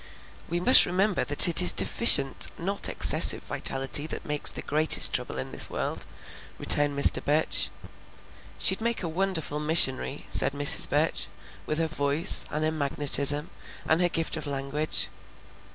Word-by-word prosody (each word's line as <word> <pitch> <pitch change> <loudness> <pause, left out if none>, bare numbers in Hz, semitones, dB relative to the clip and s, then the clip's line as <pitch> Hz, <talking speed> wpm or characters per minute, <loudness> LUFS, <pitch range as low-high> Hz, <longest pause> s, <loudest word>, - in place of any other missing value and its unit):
"We 170 +1 -4
must 250 +9 +5
remember 190 +2 -2
that 145 +5 +4
it 170 +1 +4
is 180 - +5
deficient, 140 - +2
not 195 +4 -1
excessive - - +3
vitality, 135 +3 -1
that - - -9
makes 150 -1 0
the - - -7
greatest 155 +2 +3
trouble - - -6
in 65 - -8
this - - -1
world," - - -7 0.5
returned 145 -1 +3
Mr. 140 - +2
Burch. 150 +2 -2 0.9
"She'd 190 +3 0
make 235 -2 -5
a - - -5
wonderful 165 -3 -5
missionary," 150 -3 -1
said - - +3
Mrs. 145 0 +5
Burch; - - -3 0.4
"with 155 - -4
her 165 - -2
voice, 145 0 -2
and 150 +1 -6
her 155 - -2
magnetism, 145 0 0 0.4
and 160 +2 -1
her 175 - -1
gift 165 -1 -3
of - - -9
language." 140 +2 -4
155 Hz, 150 wpm, -24 LUFS, 145-170 Hz, 0.9 s, must